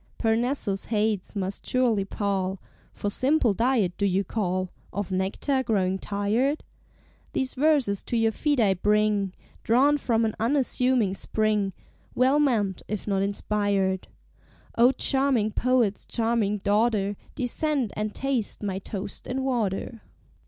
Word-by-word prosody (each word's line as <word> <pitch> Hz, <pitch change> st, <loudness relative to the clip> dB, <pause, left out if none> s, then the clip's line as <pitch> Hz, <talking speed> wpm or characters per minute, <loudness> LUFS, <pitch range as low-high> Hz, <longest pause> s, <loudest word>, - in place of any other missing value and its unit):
Parnassus 225 Hz, -3 st, 0 dB
heights 215 Hz, -2 st, -1 dB
must 195 Hz, 0 st, -3 dB
surely 240 Hz, -6 st, +1 dB
pall; 195 Hz, -2 st, -2 dB, 0.3 s
For 205 Hz, -, -3 dB
simpler 260 Hz, -2 st, +2 dB
diet 225 Hz, -5 st, +1 dB
do 200 Hz, -, +2 dB
you 195 Hz, +1 st, +1 dB
call, 185 Hz, -2 st, -2 dB, 0.2 s
Of 200 Hz, 0 st, -4 dB
nectar 195 Hz, +9 st, 0 dB
growing 190 Hz, -6 st, 0 dB
tired? 215 Hz, +10 st, 0 dB, 0.7 s
These 265 Hz, 0 st, -1 dB
verses 270 Hz, -8 st, +2 dB
to 240 Hz, -, -1 dB
your 225 Hz, -1 st, +3 dB
feet 290 Hz, +4 st, 0 dB
I 205 Hz, -4 st, +4 dB
bring, 210 Hz, 0 st, +1 dB, 0.3 s
Drawn 275 Hz, +6 st, +3 dB
from 230 Hz, -3 st, +1 dB
an 220 Hz, -, -1 dB
unassuming 250 Hz, -3 st, +2 dB
spring, 210 Hz, -1 st, 0 dB, 0.4 s
Well 265 Hz, +4 st, +4 dB
meant 220 Hz, -10 st, +1 dB
if 210 Hz, 0 st, -4 dB
not 195 Hz, -2 st, +1 dB
inspired; 200 Hz, -1 st, 0 dB, 0.7 s
O 240 Hz, +2 st, +6 dB
charming 265 Hz, -4 st, +1 dB
Poet's 240 Hz, -4 st, +1 dB
charming 225 Hz, -3 st, +1 dB
daughter, 205 Hz, -1 st, +2 dB, 0.2 s
Descend 265 Hz, -1 st, -1 dB
and 210 Hz, 0 st, -3 dB
taste 260 Hz, -6 st, -2 dB
my 195 Hz, -2 st, -2 dB
toast 200 Hz, 0 st, -6 dB
and 265 Hz, +1 st, -2 dB
water! 230 Hz, -2 st, -2 dB
215 Hz, 130 wpm, -26 LUFS, 200-255 Hz, 0.7 s, O